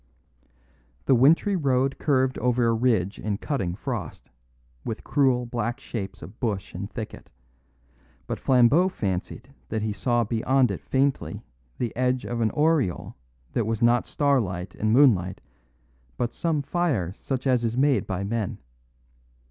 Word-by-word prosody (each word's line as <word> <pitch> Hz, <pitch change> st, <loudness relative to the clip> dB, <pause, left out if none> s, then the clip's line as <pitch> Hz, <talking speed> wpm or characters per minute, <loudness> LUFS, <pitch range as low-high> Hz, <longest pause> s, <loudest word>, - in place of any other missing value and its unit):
The -, -, +4 dB
wintry 160 Hz, -, +4 dB
road 135 Hz, -4 st, +1 dB
curved 130 Hz, -3 st, +1 dB
over 125 Hz, -1 st, +2 dB
a 115 Hz, -, +3 dB
ridge 110 Hz, -5 st, +1 dB
in 105 Hz, -2 st, -2 dB
cutting 100 Hz, -, -2 dB
frost, 110 Hz, -, -6 dB, 0.5 s
with 115 Hz, -, -5 dB
cruel 130 Hz, -4 st, +2 dB
black 120 Hz, +1 st, -3 dB
shapes 100 Hz, -7 st, -6 dB
of 110 Hz, -, -12 dB
bush 105 Hz, -5 st, -2 dB
and 100 Hz, +3 st, -5 dB
thicket; 110 Hz, -2 st, -8 dB, 1.0 s
but -, -, -4 dB
Flambeau 135 Hz, +8 st, +4 dB
fancied 100 Hz, -, -4 dB, 0.2 s
that 110 Hz, -1 st, -2 dB
he 110 Hz, -1 st, -1 dB
saw 120 Hz, +4 st, +1 dB
beyond 120 Hz, +2 st, +2 dB
it 90 Hz, -7 st, -5 dB
faintly 135 Hz, -, -1 dB, 0.3 s
the 120 Hz, -3 st, -3 dB
edge 125 Hz, 0 st, 0 dB
of 120 Hz, -1 st, -3 dB
an 110 Hz, -, +3 dB
aureole 150 Hz, -, +1 dB, 0.4 s
that 115 Hz, -3 st, 0 dB
was 115 Hz, 0 st, -1 dB
not 120 Hz, +1 st, +3 dB
starlight 100 Hz, -11 st, 0 dB
and 110 Hz, 0 st, -1 dB
moonlight, 110 Hz, -9 st, +4 dB, 0.8 s
but 120 Hz, 0 st, -1 dB
some 160 Hz, -4 st, -1 dB
fire 140 Hz, -, 0 dB
such 130 Hz, +5 st, -4 dB
as 125 Hz, -3 st, +2 dB
is 115 Hz, +1 st, -1 dB
made 140 Hz, -1 st, +2 dB
by 95 Hz, -1 st, -2 dB
men. 110 Hz, +1 st, -2 dB
120 Hz, 145 wpm, -25 LUFS, 105-135 Hz, 1.0 s, The